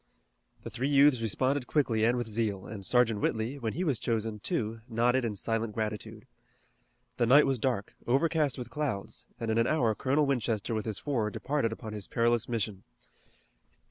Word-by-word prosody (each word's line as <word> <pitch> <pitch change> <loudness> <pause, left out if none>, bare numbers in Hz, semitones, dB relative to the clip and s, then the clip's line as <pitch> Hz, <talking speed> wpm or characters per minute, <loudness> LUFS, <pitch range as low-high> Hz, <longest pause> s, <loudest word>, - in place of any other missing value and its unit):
The - - -7
three 130 +4 -1
youths 140 -3 +5
responded 130 +4 0
quickly 115 -7 +2
and 120 +2 +2
with 120 -2 -2
zeal, 105 -3 -2
and 105 -2 -7
Sergeant 115 -1 +2
Whitley, 115 +6 -1
when 115 -4 -2
he 180 - -2
was 145 -9 0
chosen, 110 -2 -2
too, 110 +1 -2
nodded 120 +3 +2
in 110 -3 -2
silent 115 +1 -2
gratitude. 110 +1 -4 0.9
The 120 - +2
night 140 +5 +7
was 135 -2 0
dark, 110 -4 -1
overcast 145 +1 +2
with 120 -2 -7
clouds, 135 -9 -3
and 115 -1 -2
in 110 - +2
an 115 - +3
hour 125 -8 +2
Colonel 140 +6 +1
Winchester 115 -5 -1
with 110 -1 -2
his 110 -3 -3
four 120 -8 -1
departed 135 +1 -1
upon 110 -1 -7
his 105 -2 -6
perilous 120 0 +1
mission. 105 -4 -2
115 Hz, 175 wpm, -30 LUFS, 110-130 Hz, 0.9 s, night